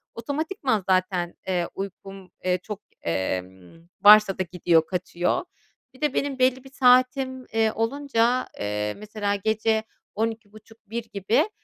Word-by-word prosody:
otomatikman 275 - -2
zaten, 185 -2 +1
eee, 180 -2 0
uykum, 195 -1 -8
eee, 180 0 +1
çok, 210 -1 -7 0.2
eee, 90 +2 -1 0.6
varsa 210 -1 +8
da 185 - 0
gidiyor, 170 -2 +3
kaçıyor. 180 -1 -1 0.5
Bir 260 - -19
de 300 -3 +1
benim 280 -2 -1
belli 255 0 +2
bir 270 - -13
saatim, 255 0 +3
eee, 225 -1 +2
olunca, 245 0 +1
eee, 105 0 -2
mesela 210 -1 -2
gece 220 +2 0 0.3
00.30-01:00 220 +1 -5
gibi, 205 - +1
215 Hz, 125 wpm, -25 LUFS, 185-250 Hz, 0.6 s, varsa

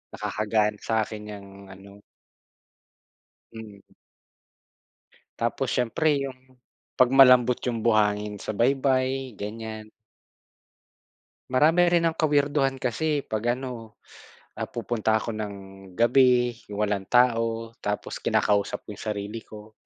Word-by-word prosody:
nakaka-gaan 105 -1 -1
sa'akin 110 -1 -2
yang 100 -1 -9 0.2
ano 100 +1 -14 1.5
Mm. 105 -3 -11 1.6
Tapos - - -1
siyempre 140 +5 +1
yung, 130 -1 -16 0.4
'pag 130 -1 +5
malambot 125 -2 +6
yung 115 -2 -1
buhangin 105 -2 +1
sa 110 - -5
baybay, 130 +1 +1
ganyan. 110 +1 -7 1.6
Marami 165 +7 +4
rin 170 -1 +3
ang 165 - +1
ka-weirduhan 145 -3 +1
kasi 145 +4 -1
'pag 120 +3 -1
ano, 120 -4 -8 0.6
ah, - - -3
pupunta 110 -2 -1
ako 115 +1 -2
ng 105 -1 -5 0.4
gabi, 120 -1 +3
yung 105 +1 -2
walang 100 -2 -2
tao, 115 -2 +2
tapos 105 0 -4
kinakausap 100 -1 0
ko - - -57
yung 100 - -10
sarili 105 +1 -4
ko. 105 0 -12
115 Hz, 110 wpm, -25 LUFS, 105-130 Hz, 1.6 s, malambot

